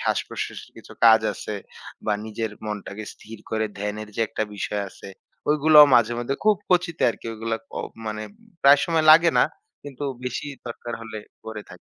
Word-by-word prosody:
শ্বাস-প্রশ্বাসের - - -3
কিছু - - -13
কাজ 110 -1 +8
আছে 105 - -6 0.5
বা 105 - +2
নিজের 110 0 -4 0.2
মনটাকে 105 0 -5
স্থির 110 0 -12
করে 110 0 0
ধ্যানের 105 +1 -4
যে - - -1
একটা - - -2
বিষয় 105 0 -2
আছে। - - -12 0.4
ওইগুলাও 150 0 +8
মাঝেমধ্যে 120 +3 +2
খুব 215 -1 +5
কচিতে 175 -2 +1
আরকি 115 - -10
ওইগুলা 115 0 -3
ক - - -60 0.4
মানে 110 0 -3 0.4
প্রায় 140 +1 +7
সময় 165 -2 +1
লাগে 165 +2 +8
না। - - +6 0.4
কিন্তু 145 0 -7 0.2
বেশি 125 +4 -3 0.2
দরকার 120 0 -6
হলে 110 -1 -7 0.3
করে 110 -2 -6
থাকি - - -11
115 Hz, 160 wpm, -24 LUFS, 110-145 Hz, 0.5 s, কাজ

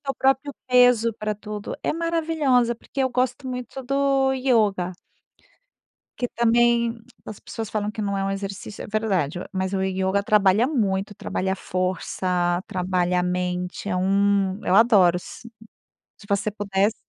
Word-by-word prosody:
teu 275 -1 -3
próprio 270 +1 +1
peso 245 -2 +4
pra 215 -1 -3
tudo 210 0 -7
é - - 0
maravilhosa 315 -7 +1
porque 255 +4 -7
eu 260 - +1
gosto 250 +1 -1
muito 250 +1 -6
do 275 0 +2
yoga 215 -9 +1 1.2
que 245 - -1
também 235 0 +2 0.3
as 215 - -7
pessoas 225 -2 -6
falam 210 -1 -1
que 215 - -6
não 200 -1 -1
é 195 - -1
um 195 - -1
exercício. 195 +1 -6
É - - -7
verdade, 195 -8 -1
mas 190 0 -2
o 190 - 0
yoga 190 +1 0
trabalha 210 +2 +4
muito, 205 -7 -1
trabalha 190 -1 -2
força, 180 -1 -1
trabalha 180 -1 0
a - - -1
mente. 180 +1 -2
É 185 - -1
um 195 +1 +2
eu 180 - +2
adoro. 200 -6 +5
Se 180 - -11 0.9
você 200 +1 0
pudesse. 205 +1 0
205 Hz, 150 wpm, -23 LUFS, 190-245 Hz, 1.2 s, adoro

